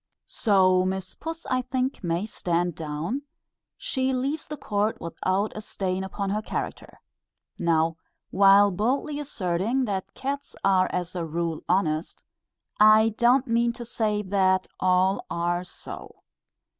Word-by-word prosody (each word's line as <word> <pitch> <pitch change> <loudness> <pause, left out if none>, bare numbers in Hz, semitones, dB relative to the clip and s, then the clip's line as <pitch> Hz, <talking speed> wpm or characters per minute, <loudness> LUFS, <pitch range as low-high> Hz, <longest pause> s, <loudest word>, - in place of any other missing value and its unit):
So 185 -4 +3
Miss 190 0 -3
Puss 325 +1 -7
I 255 0 0
think 255 -1 -2
may 170 +3 -1
stand 175 -4 -1
down: 160 - -3 0.6
she 260 0 -1
leaves 275 +5 -2
the 300 - -6
court 210 -2 -1
without 185 +5 -1
a 215 - -5
stain 190 -3 -3
upon 195 +1 -3
her 210 +1 0
character. - - -5 0.6
Now, 165 -1 +2 0.3
while 200 +1 +6
boldly 265 - -1
asserting 225 -1 -1
that 195 -4 -4
cats 280 +1 -4
are 190 -1 +3
as 180 0 -3
a 175 -2 -3
rule 165 0 -2
honest, 165 -3 0 0.6
I 215 +1 +7
do 225 +2 -2
not 255 +2 +4
mean 235 0 +2
to 240 - -8
say 215 -2 -1
that 190 -1 +2
all 185 +1 +2
are 175 +1 -1
so. 180 - -10
195 Hz, 140 wpm, -26 LUFS, 180-235 Hz, 0.6 s, I